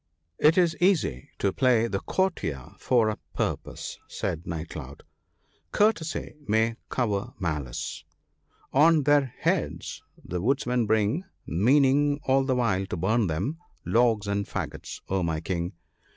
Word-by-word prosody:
' 80 +1 -49
It 160 - 0
is 170 -3 +4
easy 170 - +2
to 100 -2 0
play 125 -2 +3
the 95 -4 -1
courtier 80 - -2
for 120 -4 +3
a 105 - -4 0.2
purpose,' - - -3
said 80 +1 -4
Night 80 -1 -4
cloud, 70 -3 -8 0.3
— - - -41
•' - - -48
Courtesy 205 -6 +1
may 110 +2 +2
cover 115 -1 -1
malice; 75 - -3 0.7
on 155 +2 +5
their 145 -3 +3
heads - - -1 0.2
the 90 0 -3
woodmen 125 0 +1
bring, 110 - +1 0.2
Meaning 140 - +3
all 135 0 +3
the 130 -1 +1
while 100 -6 +1
to - - -4
burn 105 +5 +2
them, 95 - -2 0.3
logs 115 -3 +3
and 100 0 -1
faggots— - - -5
oh, 95 0 0
my 80 -2 -1
King! 85 +2 -3
110 Hz, 145 wpm, -27 LUFS, 90-135 Hz, 0.7 s, on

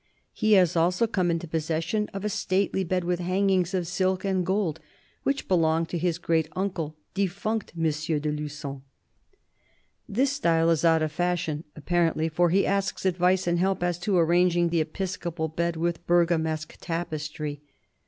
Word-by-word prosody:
He 215 0 +2
has 180 -4 +5
also 180 +6 +3
come 185 -6 0
into 170 0 -1
possession 165 +6 -1
of 195 +1 -5
a - - +1
stately 190 0 0
bed 180 0 -1
with 175 0 -1
hang 185 +3 +1
ings 185 0 +1
of 180 -2 0
silk 185 +2 0
and 190 -2 +1
gold, 185 -4 0 0.4
which 275 0 -1
belonged 165 -2 +2
to 175 - -2
his 170 0 0
great 165 -2 0
uncle, 180 -5 -2
" - - -48
deffunct 200 +1 -2
M. 155 -1 0
de 150 0 -1
Lugon." 145 -2 -5 1.3
This 260 +6 +2
style 165 -12 +2
is 165 -1 +1
out 165 -1 +4
of 155 - -1
fashion, 165 -2 -1
apparently, 165 0 +1
for 175 +2 +2
he 195 +4 +3
asks 195 -1 -1
advice 185 +1 +2
and 175 0 +1
help 190 0 +1
as 175 -1 0
to 190 +1 +1
arranging 175 +1 +3
the 165 -1 +2
episcopal 170 0 -3
bed 170 +2 -1
with 170 +1 -2
Bergamesque 160 -3 +1
tapestry. 155 -3 -4
175 Hz, 165 wpm, -26 LUFS, 160-185 Hz, 1.3 s, has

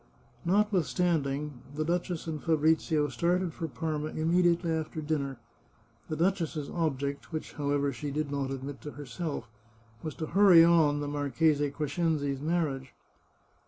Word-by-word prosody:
Notwithstanding, 160 - +1
the 155 +1 -1
duchess 175 0 -1
and 155 -2 -4
Fabrizio 160 -1 +2
started 170 +7 0
for 165 - -4
Parma 155 0 -3
immediately 170 +2 +2
after 160 0 -2
dinner; 145 -4 -2 0.7
the 155 - -1
duchess's 165 -4 0
object, 140 -4 -2
which, 155 -1 -5
however, 145 -1 0
she 145 +4 -5
did 145 0 -2
not 140 -2 -1
admit 135 +1 -6
to 150 - -7
herself, 145 -2 -5 0.5
was 155 - -5
to 160 - -3
hurry 185 -1 +7
on 160 -4 +4
the 145 - -3
Marchese 145 +1 +1
Cres 145 +1 -4
cenzi's 145 -5 0
marriage. 150 -5 -1
155 Hz, 135 wpm, -29 LUFS, 140-165 Hz, 0.7 s, hurry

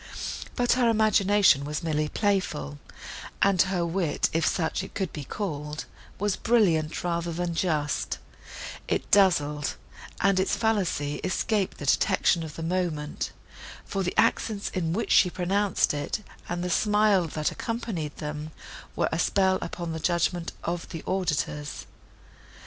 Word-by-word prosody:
But 245 -1 +2
her 245 -2 +4
imagination 205 -7 +4
was 150 +2 -3
merely 155 -2 0
playful, 165 - -1 0.6
and 195 -3 +4
her 185 -2 +1
wit, 170 -2 0
if 165 0 +2
such 165 +2 0
it - - -10
could 190 -5 -2
be 150 - -5
called, 150 -3 -4 0.3
was 205 0 0
brilliant, 175 -10 +2
rather 170 -1 -1
than 170 +1 -2
just; 155 -4 0 0.7
it - - -1
dazzled, 150 -7 +3 0.4
and 195 0 +3
its 190 - +1
fallacy 185 -10 0
escaped 195 +1 -1
the 145 - -6
detection 180 +3 +3
of 155 -2 -7
the 165 - -5
moment; 165 -4 -2 0.5
for 195 - -2
the 180 -1 -2
accents, 205 -2 +1
in 165 -3 -1
which 210 +7 -1
she 180 - +6
pronounced 195 +2 +1
it, 145 +8 -3 0.3
and 175 0 -2
the 180 - -2
smile, 210 -3 +3
that 155 0 -1
accompanied 220 -10 -4
them, 150 0 -5 0.5
were - - +1
a 160 - -1
spell 190 0 +3
upon 170 -2 -4
the 160 - -4
judgment 170 0 0
of 170 0 -3
the 165 - -6
auditors. 150 -5 -2
175 Hz, 145 wpm, -27 LUFS, 155-195 Hz, 0.7 s, she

